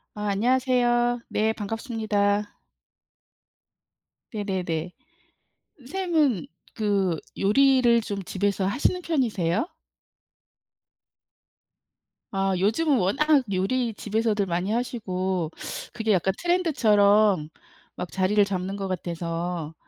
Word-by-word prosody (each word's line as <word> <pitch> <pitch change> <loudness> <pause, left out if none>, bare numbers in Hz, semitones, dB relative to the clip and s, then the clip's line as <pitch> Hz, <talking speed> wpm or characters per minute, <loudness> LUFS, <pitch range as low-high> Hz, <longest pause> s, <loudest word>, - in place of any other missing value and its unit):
아 210 0 -3
안녕하세요. 240 +2 +2
네, 220 +1 +1
반갑습니다. 210 -2 -1 1.8
네네네. 180 -5 -3 0.9
선생님은 295 - 0 0.3
그 200 -6 0 0.2
요리를 245 +2 +4
좀 200 -3 -5
집에서 200 +1 -1
하시는 280 - 0
편이세요? 225 - 0 2.7
아 195 -1 0
요즘은 255 - +2
워낙 275 +9 +3
요리 230 +6 0
집에서들 215 0 0
많이 180 +3 -1
하시고 190 -8 -2 0.4
그게 225 -2 -1
약간 190 +1 +1
트렌드처럼 215 - +3 0.5
막 180 - -6
자리를 195 +2 +3
잡는 195 -1 -3
것 195 -1 -4
같아서 170 -2 -4
210 Hz, 210 characters per minute, -25 LUFS, 190-240 Hz, 2.7 s, 요리를